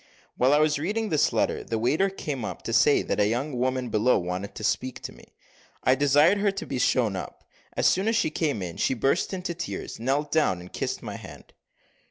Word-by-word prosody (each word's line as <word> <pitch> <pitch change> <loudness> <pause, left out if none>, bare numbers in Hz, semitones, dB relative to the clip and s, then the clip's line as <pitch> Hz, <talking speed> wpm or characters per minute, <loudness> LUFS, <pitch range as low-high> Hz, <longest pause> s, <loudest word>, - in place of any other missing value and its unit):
While 130 +2 +3
I 145 - +5
was 150 -1 +2
reading 210 +7 -1
this 155 -4 +2
letter - - 0
the 115 - -3
waiter 155 - +2
came 145 - -5
up - - -6
to - - -4
say - - +4
that - - -2
a 105 - +4
young 125 +6 -2
woman 130 0 -1
below 110 +3 +3
wanted 90 +2 -4
to 110 - -7
speak 105 +5 -1
to - - -5
me. - - -18 0.5
I 130 - +5
desired 145 +8 +4
her 200 0 +2
to 195 +2 -4
be 125 - -3
shown 120 -4 +2
up. 95 - -7 0.3
As - - +1
soon 190 +3 +3
as 225 - +2
she 155 -8 +1
came 145 - -1
in, 85 -2 -6
she 130 - +1
burst 135 +8 +1
into 180 -2 -3
tears, 175 -8 -6
knelt 140 +5 -1
down, 150 - +2
and 90 +1 -12
kissed - - -3
my - - -6
hand. - - -13
135 Hz, 225 wpm, -26 LUFS, 115-160 Hz, 0.5 s, I